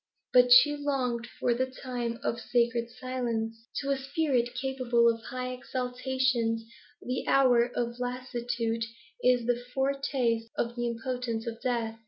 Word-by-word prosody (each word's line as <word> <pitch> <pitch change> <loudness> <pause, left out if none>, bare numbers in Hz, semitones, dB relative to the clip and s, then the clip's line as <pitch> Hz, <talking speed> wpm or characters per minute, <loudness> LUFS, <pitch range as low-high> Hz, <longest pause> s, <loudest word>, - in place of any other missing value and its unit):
But 250 0 +6
she 295 +4 +8
longed 255 -5 -1
for 240 +1 0
the 260 +2 0
time 250 -3 -4
of 235 - -1
sacred 235 -1 +1
silence. 235 -3 -3 0.3
To 280 0 -1
a 275 - +2
spirit 265 -4 0
capable 250 -2 +2
of 230 -1 +2
high 255 0 -4
exaltations, 250 -2 -1 0.4
the 250 +1 -3
hour 250 -3 +5
of 235 0 -2
lassitude 240 -2 -2 0.4
is 245 -1 +3
a 245 0 +1
foretaste 265 -4 0
of 235 0 -1
the 240 0 -1
impotence 235 -1 -3
of 230 -1 -5
death. 230 -3 -1
245 Hz, 140 wpm, -29 LUFS, 235-255 Hz, 0.4 s, she